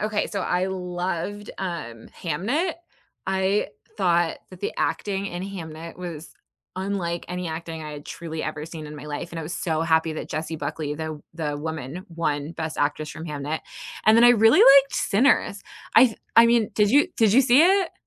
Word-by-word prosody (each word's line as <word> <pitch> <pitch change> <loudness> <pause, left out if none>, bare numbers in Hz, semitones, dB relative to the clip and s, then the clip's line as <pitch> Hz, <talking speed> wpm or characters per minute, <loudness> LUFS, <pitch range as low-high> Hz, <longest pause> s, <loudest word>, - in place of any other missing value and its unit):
Okay, 215 0 0
so 200 - -4
I 180 +1 0
loved, 185 +2 -4
um, 160 -12 -5
Hamnet. 230 - -1 0.5
I 190 +2 +1 0.3
thought 175 -4 +2
that 185 -1 -13
the - - -2
acting 200 -1 -1
in 175 0 -5
Hamnet 165 -4 -7
was 170 -3 -7 0.4
unlike 185 -3 -3
any 180 0 -4
acting 160 0 -6
I 150 0 -6
had 145 0 -9
truly 160 -2 -6
ever 155 -1 -4
seen 160 -1 -8
in 150 0 -9
my 145 - -9
life, 150 +3 -5
and 165 - -6
I - - -4
was 160 +4 -5
so 160 -2 -1
happy 160 -1 +2
that - - -6
Jessie 160 +1 -3
Buckley, 150 0 -4
the 155 -1 -5
the 150 -3 -3
woman, 160 +4 -5
won 155 -2 -2
Best 160 -1 -5
Actress 150 +1 -1
from 160 - -8
Hamnet. 150 +1 -3 0.5
And 220 +1 +7
then 235 - +7
I 240 - +9
really 225 -1 +6
liked 275 0 +7
Sinners, 205 -2 +2 0.3
I 255 - +9
th 225 - -7 0.2
I 230 0 +9
mean, 230 -2 +3
did 210 0 +3
you 290 +6 +5
did 220 -3 +4
you 265 - +7
see 260 +3 +5
it? 380 0 +3
175 Hz, 190 wpm, -24 LUFS, 155-205 Hz, 0.5 s, I